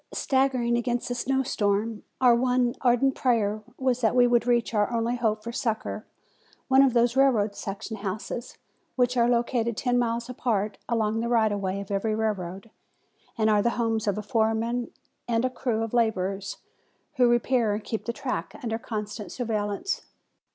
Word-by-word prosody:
Staggering 260 -3 +1
against 240 0 -1
the - - 0
snow 265 +2 0
storm 210 -1 0 0.2
our 250 -2 +6
one 250 0 +2
ardent 255 +2 +3
prayer 215 -5 +1 0.2
was 255 -1 0
that 225 0 +2
we 245 -1 +6
would 240 -1 +2
reach 240 -1 +2
our 210 +1 +1
only 235 +1 0
hope 220 -3 0
for 235 - -5
succor 220 -2 -3 0.6
one 265 0 +6
of 270 -3 +4
those 240 0 +3
railroad 230 -7 +3
section 205 +3 -5
houses, 215 +4 -5 0.4
which 250 -1 +2
are 240 -1 +3
located 235 -1 0
ten 245 -1 +1
miles 235 0 -1
apart 220 -5 -1
along 225 -2 +1
the 235 +1 -1
right 225 -3 +3
of 205 - -1
way 190 0 -2
of 200 0 -7
every 215 +2 0
railroad, 200 -2 -3 0.7
and 220 -1 +2
are 210 -1 +4
the 235 +3 0
homes 225 -2 0
of 205 - +1
a 215 - -3
foreman 225 +2 0 0.4
and 235 +1 +1
a 255 - 0
crew 240 -3 -1
of 225 - -5
laborers 195 -4 0 0.6
who 250 -1 +5
repair 240 -3 +2
and 210 - -5
keep 220 +1 -4
the 235 - -1
track 265 +1 -4
under 225 -1 -2
constant 210 -4 -5
surveillance. 215 - -2
230 Hz, 175 wpm, -26 LUFS, 215-245 Hz, 0.7 s, our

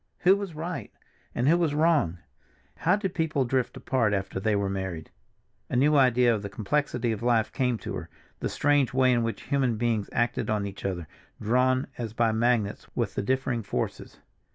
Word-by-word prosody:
Who 185 +2 +6
was 200 -5 -5
right, 170 +3 -5 0.4
and 125 - +1
who 170 +3 +5
was 160 -4 +1
wrong? 150 - +2 0.6
How 180 +3 +3
did 200 -3 -3
people 155 -5 0
drift 130 0 -1
apart 115 -6 +1
after 95 -1 -2
they 105 +2 +1
were 100 -1 0
married? 95 -4 -4 0.6
A - - -2
new 145 +4 +4
idea 125 -3 +4
of 105 - -2
the 100 - -5
complexity 120 +2 -1
of 110 -1 -4
life 115 -2 +2
came 125 -3 +1
to - - -6
her, - - -6 0.3
the - - -2
strange 145 -3 +2
way 130 -1 +4
in 120 -1 +2
which 115 0 -3
human 130 -5 0
beings 115 -3 0
acted 120 0 0
on 105 -2 0
each 100 0 -7
other, 90 -5 -3 0.3
drawn, 130 +4 +2
as 115 -3 -4
by 115 0 +2
magnets, 110 -2 0
with - - -1
the - - -1
differing 130 +1 0
forces. 100 - -4
120 Hz, 190 wpm, -27 LUFS, 105-140 Hz, 0.6 s, Who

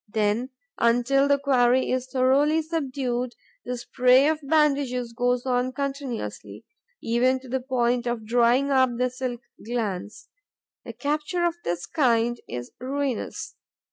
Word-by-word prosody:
Then, 215 +3 0 0.3
until 245 +4 +3
the 280 0 +4
quarry 260 -2 +2
is 255 0 -1
thoroughly 275 +5 +2
subdued, 260 -6 -2 0.3
the 250 0 -3
spray 255 +3 +4
of 310 0 +1
bandages 275 -5 +1
goes 245 +1 0
on 250 0 0
continuously, 275 -3 -5 0.4
even 250 +3 +2
to 260 - -13
the 260 +2 -1
point 245 -1 0
of 240 -2 -3
drying 245 +4 +3
up 260 -1 +4
the 250 0 0
silk 250 -1 -4 0.2
glands. 210 -4 -4 0.6
A - - -6
capture 300 +4 -1
of 340 - +1
this 175 0 -2
kind 240 -5 +1
is 120 0 -6
ruinous. 270 -1 -3
255 Hz, 135 wpm, -25 LUFS, 240-275 Hz, 0.6 s, the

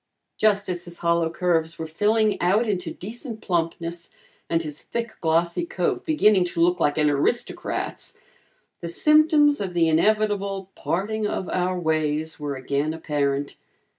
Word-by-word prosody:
Just 205 -1 +2
as 175 -1 -4
his 175 0 -8
hollow 170 -1 +1
curves 165 -1 0
were 160 - -4
filling 210 +6 +1
out 195 +7 +3
into 180 -5 -1
decent 225 - -7
plumpness 170 -2 -2 0.4
and 165 0 +1
his 150 -1 -8
thick 235 -1 -4
glossy 170 - +1
coat 340 - -2
beginning 215 - +4
to 175 - -5
look 175 +1 +3
like 145 -2 +1
an 150 -1 +3
aristocrat's 145 - -2 0.6
the 170 - -5
symptoms 300 - +4
of 185 -3 -4
the 165 -1 +3
inevitable 200 +2 +1
"parting 210 +4 -2
of 190 - -3
our 185 0 0
ways" 155 -1 -1
were 145 -1 -3
again 140 +4 -1
apparent. 145 -3 -2
175 Hz, 145 wpm, -24 LUFS, 160-210 Hz, 0.6 s, beginning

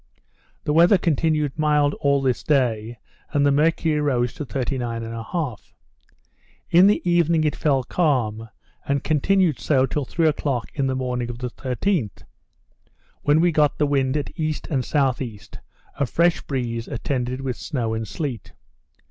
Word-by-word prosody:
The 150 - 0
weather 175 +5 +6
continued 155 -3 0
mild 150 -1 +3
all 140 -1 +2
this 130 -2 0
day, 120 -5 0 0.4
and 145 -1 +3
the 140 - +4
mercury 155 +1 +2
rose 125 -5 0
to 150 - -6
39 120 -3 -3
1/2. 115 - -4 1.1
In 180 +3 +7
the 205 -3 +1
evening 170 -2 +3
it 150 - 0
fell 135 -4 +1
calm, 120 -9 0 0.4
and 140 0 0
continued 165 -1 +2
so 135 -3 +2
till 145 +1 -3
three 165 +4 +1
o'clock 140 -5 -1
in 140 -3 0
the 130 - -1
morning 125 -2 -2
of 120 - -6
the 125 0 -5
13th, 130 - -2 1.0
when 145 +2 +3
we 175 0 +3
got 150 -2 +2
the 150 - +2
wind 140 -1 +1
at 145 - -4
E. 155 -1 0 0.2
and 135 -4 +1
S.E., 130 -6 -1 0.6
a 140 - +2
fresh 170 +7 +2
breeze 120 -4 -3
attended 125 +1 -3
with 130 -2 -3
snow 120 -6 -3
and 110 0 -3
sleet. 135 - -5
140 Hz, 155 wpm, -23 LUFS, 125-155 Hz, 1.1 s, In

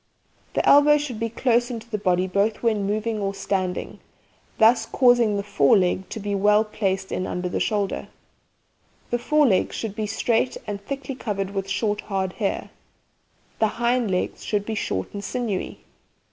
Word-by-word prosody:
The - - +1
elbow 295 +1 +7
should 275 -7 -4
be 230 0 -1
close 240 +1 +1
in 240 -2 -4
to 230 +1 -17
the 210 - -1
body 185 -2 +2
both 200 +5 0
when 215 -4 +1
moving 215 +1 -1
or 200 -1 -2
standing, 185 -2 -2 0.6
thus 225 0 +4
causing 245 -5 +4
the 200 - -2
fore 175 -6 +4
leg 185 0 0
to - - -5
be 205 0 -3
well 210 +2 +4
placed 195 -3 -2
in 185 - -2
under 180 0 -3
the 180 - -2
shoulder. 205 -2 -1 1.0
The 240 - +1
fore 300 +4 +3
legs 195 -8 +2
should 215 -3 -4
be 215 -1 -2
straight 230 +4 0
and 200 -1 -5
thickly 275 +4 -5
covered 200 -6 -3
with 195 -1 -3
short 210 0 -1
hard 190 -2 -2
hair. 200 - -2 0.9
The 220 - +4
hind 240 -1 +1
legs 180 -1 -2
should 205 -1 -1
be 225 - -3
short 95 - -3
and 200 0 -5
sinewy. 220 -3 -3
210 Hz, 175 wpm, -24 LUFS, 195-235 Hz, 1.0 s, elbow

